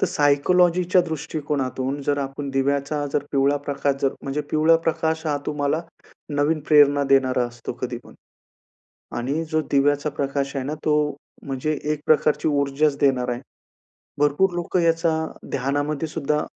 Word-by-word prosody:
तर - - +3
सायकॉलॉजीच्या 175 +5 +3
दृष्टीकोनातून 145 -3 -3
जर 145 +1 0
आपण 140 +1 -4
दिव्याचा 140 +2 0
जर - - +1
पिवळा 140 +1 +3
प्रकाश 140 0 0
जर 135 - +2
म्हणजे 140 +2 -2
पिवळा 155 +2 +4
प्रकाश 160 0 0
हा 150 -2 +1
तुम्हाला 150 +1 0 0.5
नवीन 150 +2 +1
प्रेरणा 145 -2 +6
देणारा 130 -2 +3
असतो 120 -1 -7
कधीपण. - - -6 1.0
आणि 140 +7 -1
जो 155 0 +2
दिव्याचा 145 +1 +2
प्रकाश 140 0 -2
आहे 135 - -2
ना, 150 - -3
तो 150 -2 +2 0.3
म्हणजे 140 +3 -2
एक 150 - -2
प्रकारची 155 0 +3
ऊर्जाच 140 0 +1
देणार 130 -3 +2
आहे. 120 - -4 0.8
भरपूर 145 +6 +2
लोकं 175 +1 -1
याचा 165 0 +2 0.4
ध्यानामध्येसुद्धा 145 +2 -1
145 Hz, 135 wpm, -23 LUFS, 140-155 Hz, 1.0 s, प्रेरणा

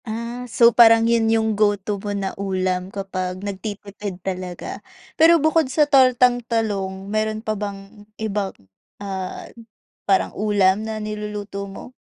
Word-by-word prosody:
Ah, 235 +2 -5
so 235 +1 +5
parang 225 -1 +7
yun 230 -1 +2
yung 220 -1 +2
go 205 -1 +2
to 200 +1 -4
mo 205 - -5
na 200 -1 -2
ulam 185 -1 -2
kapag 185 -2 -4
nagtitipid 200 -1 -6
talaga. 185 -2 -5 0.3
Pero 330 +1 +6
bukod 315 -2 +2
sa 300 +3 +3
tortang 255 -3 +4
talong, 195 -4 -2
meron 215 +2 -2
pa 215 - 0
bang 205 0 -8
ibang, 210 -2 -2 0.5
ah, 190 -2 -5 0.6
parang 195 - +2
ulam 200 -1 +2
na 220 0 -4
niluluto 210 -2 -5
mo? 195 +5 -10
210 Hz, 140 wpm, -22 LUFS, 195-225 Hz, 0.6 s, parang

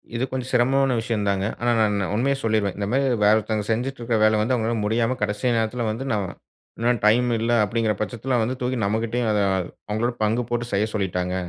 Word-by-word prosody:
இது 120 - -1
கொஞ்சம் 130 -1 -4
சிரமமான 130 +1 +3
விஷயந்தாங்க. 100 -4 -1 0.2
ஆனா, 120 0 +2
நான் 105 -2 +2
நான் 95 - -2
உண்மைய 135 +5 +1
சொல்லிருவேன். 110 -4 0
இந்தமாரி 120 +7 0 0.2
வேற 105 +1 +6
ஒருத்தவங்க 110 -1 -2
செஞ்சுட்டு 125 +4 -2
இருக்கிற 115 -1 0
வேலைய 110 0 +4
வந்து 120 +4 +1
அவுங்கனால 115 0 -1
முடியாம 115 +3 +1
கடைசி 105 +4 0
நேரத்தில 115 +2 -1
வந்து 115 +5 -4
நாம 105 -2 0 0.5
இன்னும் 120 -1 +1
டைம் 120 +3 +4
இல்ல 115 +1 0
அப்பிடிங்கிற 110 +1 0
பட்சத்தில 120 +4 -2
வந்து 125 +4 -1
தூக்கி 125 0 -1
நம்மகிட்டேயும் 115 +3 -1
அத 105 - +1 0.5
அவுங்களோட 115 +3 0
பங்கு 110 +3 +1
போட்டு 120 0 -1
செய்ய 100 +2 +2
சொல்லிட்டாங்க. 90 -3 -1
115 Hz, 190 wpm, -23 LUFS, 105-120 Hz, 0.5 s, வேற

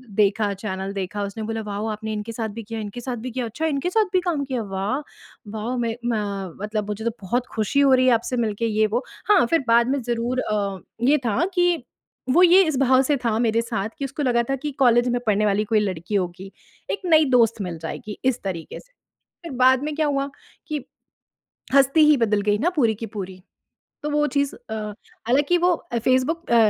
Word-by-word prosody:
देखा 205 0 +2
चैनल 195 -1 -5
देखा, 200 +1 -3
उसने 200 +2 -5
बोला 225 +1 -3
वाओ 210 0 -4
आपने 220 0 -4
इनके 210 +2 -4
साथ 225 -1 -3
भी - - -6
किया, 225 +1 -6
इनके 215 +3 -6
साथ 245 0 -4
भी 255 - -4
किया, 250 +1 -3
अच्छा 235 +8 -4
इनके 305 +2 0
साथ 435 +4 +3
भी 370 - +4
काम 340 -5 -1
किया। 260 -3 -2
वाह! 200 +6 -2 0.5
वाओ 220 +3 -3
मैं 230 -2 -1
म 200 -6 -2
मतलब 210 -1 -2
मुझे 210 +2 -4
तो 235 - +1
बहुत 240 +6 -1
ख़ुशी 220 +6 +1
हो 275 -1 +5
रही 255 0 +4
है 250 - +6
आपसे 235 +2 -1
मिलके 225 -1 -1
ये 215 -1 +2
वो। 235 +5 -1 0.3
हाँ, 390 -10 +6
फ़िर 325 +2 +1
बाद 235 +1 +4
में 275 0 0
ज़रूर 240 +2 -1
अ, 200 -4 -2 0.2
ये 275 +5 +4
था 230 +9 +1
कि 350 -5 +2 0.5
वो 350 +7 +6
ये 365 +2 +7
इस 310 -4 -1
भाव 260 -1 +5
से 285 +2 +1
था 220 -2 +2
मेरे 230 -1 +2
साथ 220 -3 -3
कि 275 - -1
उसको 275 +2 -4
लगा 240 -3 +2
था 270 - +1
कि 295 +3 -4
कॉलेज 240 -2 +4
में 245 0 +1
पढ़ने 210 0 +3
वाली 205 +1 +2
कोई 215 - +5
लड़की 190 -1 -3
होगी, 190 0 -3 0.4
एक - - -3
नई 315 -3 +5
दोस्त 230 -3 +3
मिल 180 -3 -4
जाएगी 205 +6 -6
इस 260 -2 +1
तरीके 180 -5 -5
से। - - -20 0.5
फ़िर 335 - -6
बाद 260 +1 +5
में 305 0 -3
क्या 310 -1 +1
हुआ 280 -1 -1 0.4
कि 300 -5 -3 0.9
हस्ती 275 +3 +5
ही 300 - +6
बदल 215 -3 +2
गई 205 0 +1
ना 330 +10 +1
पूरी 230 -7 +3
की 225 - -6
पूरी। 190 -3 -7 0.6
तो 300 - -1
वो 295 0 +2
चीज़ 280 -1 0
अ, 220 - -9 0.5
हालाँकि 285 +8 +3
वो 355 +1 +3 0.3
फेसबुक 270 +7 +1
अ, - - +6
235 Hz, 215 wpm, -23 LUFS, 210-275 Hz, 0.9 s, ये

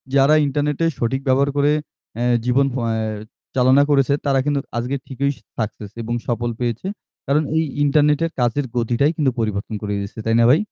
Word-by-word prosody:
যারা 140 +2 +5
ইন্টারনেট 145 +1 -1 0.2
সঠিক 135 +3 0
ব্যবহার 135 +2 +3
অ্যা 145 - -8
করে 145 +1 +3 0.7
জীবন 130 +3 +3
অ্যা 120 -3 -1 0.7
চালনা 130 +2 +5
করেছে 140 -1 +3
তারা 135 -1 +3
কিন্তু 145 -1 +1 0.2
আজকে 125 +4 -1
ঠিকই 140 +1 -1 0.3
সাকসেস 105 -2 -4
এবং 115 +1 -3
সফল 120 0 -1
হয়েছে। 120 - -2 0.4
কারণ 150 +3 +2
এই 160 - +3 0.2
ইন্টারনেটের 150 +3 +3
কাজের 125 +3 +1
গতিটাই 120 +6 +2
কিন্তু 140 -4 +2
পরিবর্তন 105 -1 -2
করে 105 -1 -3
দিয়েছে। 100 +2 -7
তাই 115 0 +2
না 115 - +5
ভাই? 150 - +6
135 Hz, 170 wpm, -21 LUFS, 120-145 Hz, 0.7 s, ভাই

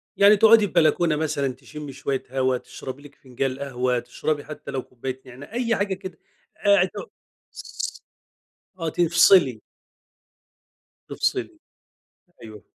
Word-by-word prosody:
يعني 200 +1 +6
تقعُدي 220 0 +6
في - - -14
بلكونة 165 -1 +3
مثلًا، 140 -4 -1
تشمي 145 +2 -10
شوية 135 0 -3
هوا، 130 -1 +1
تشربي 130 +2 -9
لِك 145 0 -15
فنجال 130 +1 -4
قهوة، 125 -3 -1
تشربي 150 +4 -3
حتى 155 -2 -8
لو 135 -1 -2
كوباية 130 +1 -7
نعنا 130 - -12
أي 235 -2 0
حاجة 200 -1 -1
كده 190 -3 -8 0.5
أ 200 -2 +6
تو 345 - -7 0.5
ص - - -6 0.8
آه، 165 - -1
تفصلي. 170 - +4 1.5
تفصلي، 345 -4 -2 0.8
أيوه. 110 -3 -11
145 Hz, 125 wpm, -24 LUFS, 130-185 Hz, 1.5 s, يعني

